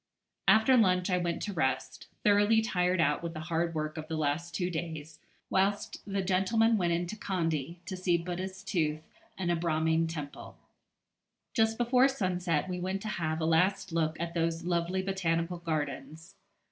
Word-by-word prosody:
After 220 Hz, +4 st, +6 dB
lunch 185 Hz, -5 st, +3 dB
I 180 Hz, -, +2 dB
went 170 Hz, -1 st, -2 dB
to 205 Hz, -, -3 dB
rest, 135 Hz, -7 st, -2 dB, 0.2 s
thoroughly 205 Hz, +2 st, +5 dB
tired 180 Hz, -4 st, +1 dB
out 150 Hz, -2 st, +2 dB
with 170 Hz, -1 st, -5 dB
the -, -, -4 dB
hard 165 Hz, +1 st, -1 dB
work 155 Hz, +1 st, -3 dB
of 155 Hz, 0 st, -6 dB
the 160 Hz, -, -3 dB
last 155 Hz, +3 st, -1 dB
two 180 Hz, -1 st, -1 dB
days, 160 Hz, -2 st, -5 dB, 0.3 s
whilst 200 Hz, +2 st, 0 dB
the 195 Hz, -1 st, 0 dB
gentlemen 195 Hz, +5 st, +3 dB
went 175 Hz, -5 st, +1 dB
into 175 Hz, +4 st, -1 dB
Kandy, 170 Hz, -6 st, -2 dB
to 185 Hz, -, -4 dB
see 180 Hz, -2 st, +2 dB
Buddha's 185 Hz, +2 st, -5 dB
tooth 155 Hz, -3 st, -1 dB, 0.3 s
and 175 Hz, -2 st, 0 dB
a -, -, +2 dB
Brahmin 160 Hz, 0 st, +1 dB
temple. 150 Hz, -3 st, -7 dB, 1.0 s
Just 225 Hz, -1 st, +2 dB
before 250 Hz, +2 st, +4 dB
sunset 180 Hz, -, -1 dB
we 180 Hz, -1 st, -3 dB
went 190 Hz, +2 st, -3 dB
to 215 Hz, -, -3 dB
have 160 Hz, -5 st, -2 dB
a -, -, +1 dB
last 180 Hz, +4 st, +2 dB
look 160 Hz, -1 st, 0 dB
at 170 Hz, 0 st, -3 dB
those 165 Hz, 0 st, -1 dB
lovely 175 Hz, +2 st, 0 dB
Botanical 175 Hz, -2 st, -1 dB
Gardens. 155 Hz, +1 st, -4 dB
175 Hz, 170 wpm, -30 LUFS, 160-190 Hz, 1.0 s, After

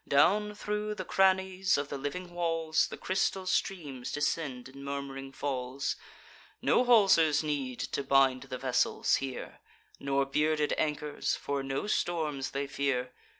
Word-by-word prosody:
Down 210 Hz, +9 st, +3 dB
thro' 210 Hz, 0 st, -2 dB
the -, -, -5 dB
crannies 190 Hz, 0 st, +3 dB
of 145 Hz, 0 st, -2 dB
the 140 Hz, -, -3 dB
living 175 Hz, +6 st, -5 dB
walls 165 Hz, -2 st, +1 dB
The -, -, -8 dB
crystal 190 Hz, 0 st, 0 dB
streams 150 Hz, -9 st, -2 dB
descend 145 Hz, -4 st, -2 dB
in 135 Hz, +1 st, -11 dB
murm'ring 140 Hz, -1 st, -5 dB
falls: 135 Hz, -1 st, -2 dB, 0.6 s
No -, -, +3 dB
haulsers 190 Hz, -11 st, +5 dB
need 140 Hz, -5 st, -2 dB
to 140 Hz, -, -2 dB
bind 135 Hz, -1 st, +4 dB
the 130 Hz, -, -3 dB
vessels 125 Hz, -1 st, +2 dB
here, 135 Hz, -2 st, -6 dB, 0.4 s
Nor 140 Hz, 0 st, +1 dB
bearded 150 Hz, +2 st, +1 dB
anchors; 150 Hz, -1 st, -1 dB
for 140 Hz, -1 st, -2 dB
no 135 Hz, +4 st, -2 dB
storms 155 Hz, -9 st, -1 dB
they 140 Hz, +1 st, -2 dB
fear. 140 Hz, -3 st, -1 dB
145 Hz, 140 wpm, -30 LUFS, 135-175 Hz, 0.6 s, haulsers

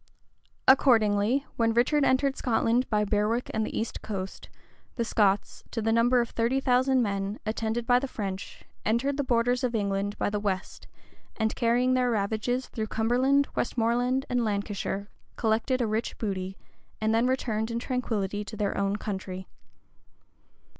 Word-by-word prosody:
Accordingly, 235 Hz, -1 st, +4 dB
when 230 Hz, -1 st, +2 dB
Richard 275 Hz, +5 st, +3 dB
entered 270 Hz, +1 st, +2 dB
Scotland 240 Hz, 0 st, +1 dB
by 210 Hz, -1 st, +2 dB
Berwick 210 Hz, +4 st, 0 dB
and 220 Hz, -, 0 dB
the -, -, -3 dB
east 225 Hz, -, -4 dB
coast, 195 Hz, -3 st, -6 dB, 0.5 s
the 235 Hz, -, -1 dB
Scots, 205 Hz, -3 st, +1 dB
to 230 Hz, -, -4 dB
the 225 Hz, 0 st, +1 dB
number 240 Hz, +2 st, +4 dB
of 235 Hz, -, -4 dB
thirty 235 Hz, +4 st, +1 dB
thousand 260 Hz, 0 st, +3 dB
men, 200 Hz, 0 st, -2 dB
attended 225 Hz, +1 st, -2 dB
by 245 Hz, 0 st, +4 dB
the 275 Hz, -, -3 dB
French, 195 Hz, -5 st, -6 dB, 0.2 s
entered 245 Hz, +6 st, +1 dB
the 285 Hz, -, +1 dB
borders 245 Hz, 0 st, +1 dB
of 245 Hz, -2 st, 0 dB
England 200 Hz, -1 st, -1 dB
by -, -, 0 dB
the 210 Hz, -, -1 dB
west, 195 Hz, -2 st, -3 dB, 0.5 s
and 220 Hz, 0 st, 0 dB
carrying 245 Hz, +1 st, +2 dB
their 250 Hz, -1 st, +2 dB
ravages 220 Hz, +4 st, -1 dB
through 220 Hz, -1 st, -4 dB
Cumberland, 255 Hz, +6 st, +2 dB
Westmoreland, 245 Hz, +3 st, 0 dB
and 245 Hz, -1 st, 0 dB
Lancashire, 200 Hz, -1 st, -2 dB, 0.3 s
collected 230 Hz, +3 st, +1 dB
a -, -, +2 dB
rich 220 Hz, +1 st, -2 dB
booty, 190 Hz, -3 st, -3 dB, 0.4 s
and 220 Hz, 0 st, +1 dB
then 230 Hz, +2 st, +3 dB
returned 225 Hz, -4 st, -1 dB
in 230 Hz, -, -2 dB
tranquillity 220 Hz, -5 st, -2 dB
to 215 Hz, +1 st, -8 dB
their 200 Hz, -1 st, -1 dB
own 200 Hz, 0 st, 0 dB
country. 190 Hz, -3 st, -5 dB
225 Hz, 155 wpm, -27 LUFS, 210-250 Hz, 0.5 s, Accordingly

